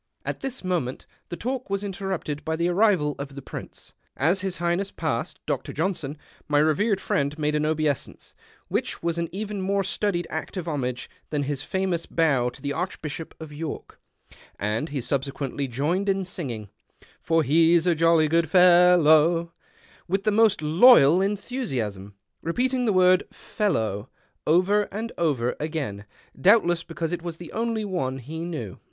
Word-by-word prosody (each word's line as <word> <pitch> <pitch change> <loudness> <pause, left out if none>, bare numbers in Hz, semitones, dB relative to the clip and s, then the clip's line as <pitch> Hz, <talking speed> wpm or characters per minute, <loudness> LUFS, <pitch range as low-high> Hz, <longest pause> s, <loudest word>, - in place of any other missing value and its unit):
At - - -3
this 265 -4 -5
moment 170 -9 -2 0.2
the 175 - -5
talk 255 0 -4
was 200 +1 -1
interrupted 190 -6 -4
by 160 - -1
the 170 +2 0
arrival 180 -6 +3
of 140 -1 -6
the 140 - -7
Prince. - - -9 0.2
As 170 +8 +2
His 190 -2 -3
Highness 175 +3 0
passed 155 -11 -3
Dr. - - -2
Johnson, 160 -3 -2 0.3
my 145 - +2
revered 190 +8 +2
friend 140 +1 -1
made 150 -1 0
an 150 0 +1
obeisance 155 -3 -2 0.3
which - - -3
was 170 0 -1
an 170 -1 -2
even 205 +1 -4
more 195 +1 +1
studied 190 -2 -1
act 160 +4 -5
of 175 -2 -4
homage 125 -5 -3 0.2
than 150 -2 -1
his 140 -1 -3
famous 185 0 -2
bow 140 -7 +2
to 125 - -15
the 140 - -1
Arehbislio]) 160 -2 -4
of 160 -2 -9
York; 155 +1 -6 0.6
and 110 - -2
he 140 -2 -3
subsequently 140 +1 -2
joined 155 +11 -1
in 195 -1 +1
singing 120 - -5 0.3
" - - -27
For 165 -1 +2
he's 165 +4 +4
a 175 - +4
jolly 165 -1 +4
good 165 0 +2
fellow 175 -2 +5 0.3
" - - -28
with 195 +2 0
the 215 - +2
most 215 -5 +3
loyal 170 - +7
enthusiasm, 135 - -3 0.3
relocating 250 +8 0
the - - +4
word 185 0 +5
" - - -43
fe 210 - -4
ellow 110 - 0 0.2
" - - -27
over 190 +6 +3
and 225 +4 -4
over 135 -8 +1
again, 145 -10 -4 0.3
doubtless 175 +1 +4
because 165 -1 -4
it 175 -1 -3
was 170 -1 -6
the 170 -2 -10
only 225 -1 -1
one 150 -10 -2
he 145 +6 -7
knew. 155 - -5
165 Hz, 170 wpm, -25 LUFS, 145-190 Hz, 0.6 s, loyal